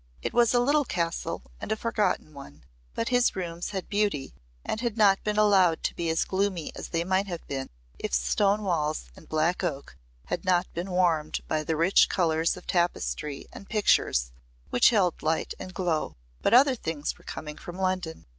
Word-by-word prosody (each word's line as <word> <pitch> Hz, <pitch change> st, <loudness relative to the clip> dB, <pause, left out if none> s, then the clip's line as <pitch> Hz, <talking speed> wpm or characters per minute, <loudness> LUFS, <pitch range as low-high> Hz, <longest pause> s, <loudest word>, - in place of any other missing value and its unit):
It -, -, -2 dB
was 240 Hz, -1 st, +4 dB
a 245 Hz, -, +4 dB
little 290 Hz, +4 st, +3 dB
castle 170 Hz, -, -2 dB, 0.2 s
and -, -, -5 dB
a -, -, +3 dB
forgotten 215 Hz, -8 st, -1 dB
one, 80 Hz, -, -12 dB, 0.3 s
but 230 Hz, -, -1 dB
his 245 Hz, -1 st, +3 dB
rooms 175 Hz, -2 st, -4 dB
had 190 Hz, -3 st, -4 dB
beauty 200 Hz, -10 st, -1 dB, 0.3 s
and 220 Hz, -, -2 dB
had 235 Hz, -3 st, -2 dB
not 200 Hz, -3 st, +4 dB
been 210 Hz, 0 st, -1 dB
allowed 195 Hz, -6 st, +4 dB
to -, -, 0 dB
be 170 Hz, -1 st, -2 dB
as 160 Hz, 0 st, +1 dB
gloomy 190 Hz, -4 st, -1 dB
as -, -, -6 dB
they 165 Hz, -1 st, 0 dB
might 190 Hz, +2 st, +1 dB
have 175 Hz, -3 st, -6 dB
been 135 Hz, -1 st, -4 dB, 0.3 s
if -, -, -3 dB
stone 195 Hz, -, +2 dB
walls 155 Hz, -, -1 dB
and -, -, -16 dB
black 160 Hz, +4 st, +1 dB
oak 140 Hz, -, -3 dB, 0.3 s
had -, -, -3 dB
not 180 Hz, -1 st, +2 dB
been 175 Hz, +3 st, -4 dB
warmed 170 Hz, -4 st, +1 dB
by 155 Hz, -1 st, 0 dB
the 160 Hz, +1 st, -1 dB
rich 170 Hz, +4 st, +5 dB
colours 165 Hz, -2 st, +1 dB
of 180 Hz, -, -12 dB
tapestry 150 Hz, -, -1 dB
and 200 Hz, -, -11 dB
pictures -, -, +2 dB, 0.4 s
which 125 Hz, -, +6 dB
held 195 Hz, -7 st, +1 dB
light 160 Hz, +1 st, 0 dB
and 185 Hz, -, -8 dB
glow. 175 Hz, -5 st, -1 dB, 0.3 s
But -, -, +4 dB
other 270 Hz, +2 st, +7 dB
things 160 Hz, -10 st, -3 dB
were -, -, -19 dB
coming 150 Hz, -1 st, -7 dB
from 175 Hz, +1 st, -9 dB
London. 185 Hz, -4 st, -2 dB
175 Hz, 190 wpm, -27 LUFS, 160-205 Hz, 0.4 s, other